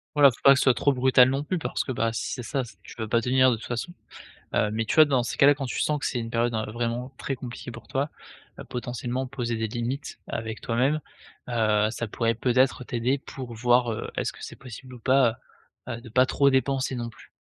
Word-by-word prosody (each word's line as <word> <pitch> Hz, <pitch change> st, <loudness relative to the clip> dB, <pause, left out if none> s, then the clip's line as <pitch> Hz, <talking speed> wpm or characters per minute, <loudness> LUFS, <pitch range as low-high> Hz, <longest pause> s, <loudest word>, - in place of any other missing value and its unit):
Voilà, 140 Hz, -2 st, +7 dB
faut -, -, -13 dB
pas 140 Hz, -, +9 dB
que -, -, +1 dB
ce -, -, +2 dB
soit 130 Hz, -, +5 dB
trop 140 Hz, +4 st, +2 dB
brutal 130 Hz, 0 st, +5 dB
non 135 Hz, +2 st, -1 dB
plus 180 Hz, +2 st, -2 dB
parce -, -, -2 dB
que, 130 Hz, -, -4 dB
bah, 115 Hz, -2 st, 0 dB
si 115 Hz, -, -3 dB
c'est 125 Hz, -, -5 dB
ça, 135 Hz, +1 st, -2 dB
c'est 120 Hz, -, -13 dB
tu -, -, -12 dB
peux 110 Hz, -2 st, -4 dB
pas 115 Hz, +2 st, +2 dB
tenir 130 Hz, +1 st, +4 dB
de -, -, +1 dB
toute -, -, -10 dB
façon, 125 Hz, +9 st, -4 dB, 0.6 s
hem, 105 Hz, -, +2 dB
mais 115 Hz, 0 st, -1 dB
tu -, -, -1 dB
vois 155 Hz, -1 st, +8 dB
dans 130 Hz, -4 st, +1 dB
ces -, -, -4 dB
cas-là 145 Hz, +1 st, +6 dB
quand 135 Hz, -, -4 dB
tu 125 Hz, -, -2 dB
sens 150 Hz, -1 st, +1 dB
que -, -, -4 dB
c'est 125 Hz, -, -1 dB
une 115 Hz, 0 st, -4 dB
période, 120 Hz, 0 st, 0 dB
heu, 110 Hz, -1 st, -2 dB
vraiment 120 Hz, +2 st, -3 dB
très 135 Hz, -, -3 dB
compliquée 125 Hz, 0 st, -8 dB
pour 115 Hz, 0 st, -11 dB
toi, 140 Hz, +3 st, -1 dB, 0.5 s
heu, -, -, -6 dB
potentiellement 125 Hz, +1 st, -3 dB
poser 125 Hz, -3 st, -3 dB
des 110 Hz, 0 st, -1 dB
limites 120 Hz, +6 st, -4 dB
avec 110 Hz, -1 st, -5 dB
toi-même, 130 Hz, +6 st, +1 dB, 0.5 s
heu, 110 Hz, -2 st, +2 dB
ça 120 Hz, -1 st, -4 dB
pourrait 115 Hz, +1 st, 0 dB
peut-être 130 Hz, +2 st, +2 dB
t'aider 125 Hz, +3 st, 0 dB
pour 130 Hz, -2 st, -8 dB
voir, 120 Hz, +1 st, +3 dB
heu, 110 Hz, -, -4 dB
est-ce -, -, -1 dB
que -, -, -12 dB
c'est -, -, -7 dB
possible 130 Hz, 0 st, -11 dB
ou -, -, -12 dB
pas, 130 Hz, -2 st, +3 dB, 0.5 s
heu -, -, -3 dB
heu, 120 Hz, -, -11 dB
de 120 Hz, -, -12 dB
pas 130 Hz, +3 st, +4 dB
trop 140 Hz, +2 st, +3 dB
dépenser 135 Hz, 0 st, +1 dB
non 120 Hz, -1 st, -4 dB
plus? -, -, -17 dB
125 Hz, 250 wpm, -26 LUFS, 115-135 Hz, 0.6 s, pas